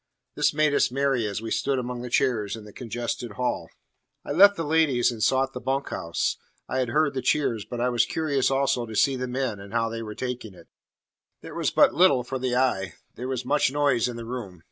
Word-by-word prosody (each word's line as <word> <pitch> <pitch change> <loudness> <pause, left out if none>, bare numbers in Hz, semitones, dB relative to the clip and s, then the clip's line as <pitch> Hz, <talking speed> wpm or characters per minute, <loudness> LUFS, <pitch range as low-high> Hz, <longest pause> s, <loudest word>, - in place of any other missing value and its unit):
'" - - -56
This - - +2
made 150 -1 +2
us - - +3
merry 135 -3 0
as 105 +2 -4
we 115 - -5
stood 140 -1 0
among 125 -1 -4
the 125 - -6
chairs 115 -5 +1
in 110 - -10
the 105 - -13
congested 120 -1 -4
hall. 125 +4 -2 0.6
I - - -5
left 200 +6 +7
the 165 - -3
ladies, 150 -6 +2
and 115 -2 -7
sought 135 +4 +2
the 125 - -6
bunk 135 +1 -1
house. 85 0 -2 0.3
I 130 - -1
had 125 -2 0
heard 150 +3 +2
the 130 - -2
cheers, 120 -9 0
but 120 - -6
I 125 +1 +1
was 120 -1 +2
curious 145 -5 0
also 135 -3 +1
to 110 - -7
see 135 +5 +3
the 125 0 -3
men, 125 -4 -2
and 100 +2 -11
how 115 -1 +1
they 115 0 -5
were 105 -1 -7
taking 125 -5 -5
it. - - -17 0.7
There - - -9
was - - 0
but - - +4
little 145 -7 +4
for 130 +2 -4
the 125 -1 -1
eye. 125 -7 0 0.2
There 125 +3 -6
was 130 -2 -3
much 140 0 +2
noise 140 -5 +2
in 120 - -5
the 115 -1 -7
room. 115 -7 -6
125 Hz, 235 wpm, -25 LUFS, 115-135 Hz, 0.7 s, left